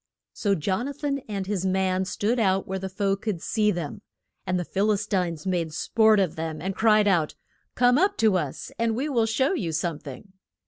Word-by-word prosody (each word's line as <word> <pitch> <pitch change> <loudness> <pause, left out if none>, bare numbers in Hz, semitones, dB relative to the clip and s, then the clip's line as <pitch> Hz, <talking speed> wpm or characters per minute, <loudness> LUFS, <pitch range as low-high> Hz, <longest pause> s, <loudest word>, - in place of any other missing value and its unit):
So 200 -3 +1
Jon 190 - -1
a 285 - -4
than 285 -1 -2
and 200 -2 -3
his 195 -2 -2
man 190 0 +1
stood 215 +6 -1
out 190 -3 +1
where 190 0 -3
the 190 0 -5
foe 195 +1 0
could 200 -3 -3
see 210 +4 +1
them. 170 -7 -3 0.5
And 185 0 +1
the 175 - -3
Phil 200 +5 +1
is 205 0 0
tines 180 -6 -1
made 175 -4 -1
sport 220 +2 +3
of 185 -5 0
them, 160 -1 -4
and 190 +4 -3
cried 215 -2 +4
out, 170 -6 +2 0.4
Come 245 +2 +4
up 390 +3 +2
to 220 -4 +3
us, 150 -7 -3
and 230 -1 +1
we 270 +6 -1
will 235 -5 +2
shew 265 - +1
you 175 - -2
some 160 0 -2
thing. 150 +8 -11
195 Hz, 215 wpm, -25 LUFS, 180-220 Hz, 0.5 s, cried